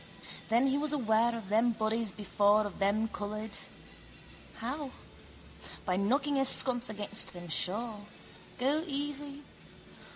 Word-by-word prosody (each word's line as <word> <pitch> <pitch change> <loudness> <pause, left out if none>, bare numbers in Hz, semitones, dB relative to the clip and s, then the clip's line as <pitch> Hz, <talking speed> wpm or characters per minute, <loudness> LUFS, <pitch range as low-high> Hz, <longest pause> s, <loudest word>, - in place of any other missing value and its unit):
Then 235 +4 +4
he 275 +1 +2
was 300 0 +3
aware 230 -3 +2
of 210 -4 -9
them 230 +3 +3
bodies 220 0 -1
before 205 +1 +2
of 205 - -7
them 205 +3 +2
coloured. 215 0 -5 1.0
How? 270 +5 -4 1.0
By 180 - +1
knocking 275 +9 +1
his 270 -1 +4
sconce 250 -2 +4
against 210 0 -1
them, 175 -1 -9
sure. 210 +6 0 0.6
Go 285 +5 +1
easy. 290 0 -3
225 Hz, 125 wpm, -31 LUFS, 210-270 Hz, 1.0 s, Then